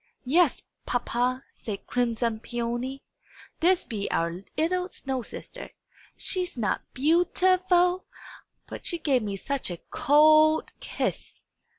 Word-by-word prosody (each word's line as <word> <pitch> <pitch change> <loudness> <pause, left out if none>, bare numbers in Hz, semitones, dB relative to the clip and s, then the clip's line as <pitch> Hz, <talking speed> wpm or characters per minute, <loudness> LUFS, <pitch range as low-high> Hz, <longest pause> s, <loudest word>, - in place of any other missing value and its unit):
"Yes, 315 +2 +3 0.2
papa," 245 +1 0
said 205 -3 -7
crimson 235 -2 0
Peony. 240 +3 -4 0.6
"This 360 +2 +3
be 205 -3 -4
our 170 +2 -1 0.2
'ittle 360 +3 0
snow 265 -7 -4
sister. - - -8 0.5
Is - - -12
she 365 -1 0
not 210 -5 0
beau 320 +6 +4
ti 370 +1 +3
ful? 360 +1 +3 0.6
But - - -8
she 345 - -2
gave 275 -6 +1
me 205 -2 -3
such 275 +6 -3
a 175 - -4
cold 310 +2 +5
kiss!" - - -4
265 Hz, 125 wpm, -27 LUFS, 235-335 Hz, 0.6 s, cold